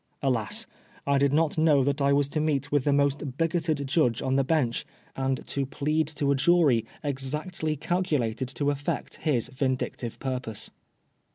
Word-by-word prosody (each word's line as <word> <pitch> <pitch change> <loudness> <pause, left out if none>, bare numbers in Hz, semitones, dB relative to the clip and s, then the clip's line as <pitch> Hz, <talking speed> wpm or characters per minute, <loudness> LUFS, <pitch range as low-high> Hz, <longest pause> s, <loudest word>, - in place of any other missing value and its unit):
Alas 120 -7 0 0.4
I 140 - 0
I - - +4
did 140 0 +3
not 155 +1 +2
know 150 -4 +5
that 140 +2 0
I 140 0 +3
was 140 0 +3
to 155 - -1
meet 145 -2 0
with 145 -3 +2
the 145 - +3
most 140 -1 +1
bigoted 165 -3 0
judge 130 -5 +2
on 130 0 +1
the 135 - +3
bench, 130 -5 +1 0.3
and 135 -1 -1
to 140 -1 -1
plead 150 +3 0
to 150 -2 -1
a - - +3
jury 140 -5 +3 0.2
exactly 150 +4 -2
calculated 145 -8 -1
to 145 -1 +1
effect 140 0 -3
his 135 -8 0
vindictive 130 -3 -2
purpose. 125 -5 -4
140 Hz, 170 wpm, -27 LUFS, 130-155 Hz, 0.4 s, know